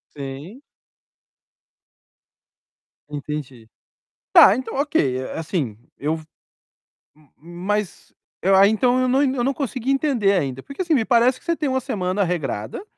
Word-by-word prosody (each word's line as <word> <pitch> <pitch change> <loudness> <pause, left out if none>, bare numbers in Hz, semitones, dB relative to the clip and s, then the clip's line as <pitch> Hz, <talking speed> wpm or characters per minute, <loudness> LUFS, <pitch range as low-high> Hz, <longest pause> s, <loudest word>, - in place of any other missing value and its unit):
Sim. 145 - -8 2.5
Entendi. 145 -5 -6 0.7
Tá, 195 - +8
então 255 - -5
ok. 145 - +1
Eh, 130 - -5
assim, 155 - -3 0.2
eu 155 +3 -1
v 160 - -11 0.9
m 150 -2 -25 0.4
mas 210 -2 -2 0.3
eu 195 +1 +3
aí 200 +1 +6
então 245 +3 +2
eu 255 - +1
não 265 +3 +3
eu 260 -3 0
não 275 - +1
consegui 260 -2 -3
entender 270 -8 +2
ainda. 135 -8 -1
Porque 280 +7 -5
assim, 335 -3 +1
me 230 -5 +2
parece 245 +1 +3
que - - -26
você 335 -1 0
tem 300 -3 -2
uma 260 0 0
semana 200 -6 -2
regrada 155 - -3
205 Hz, 145 wpm, -22 LUFS, -, 2.5 s, Tá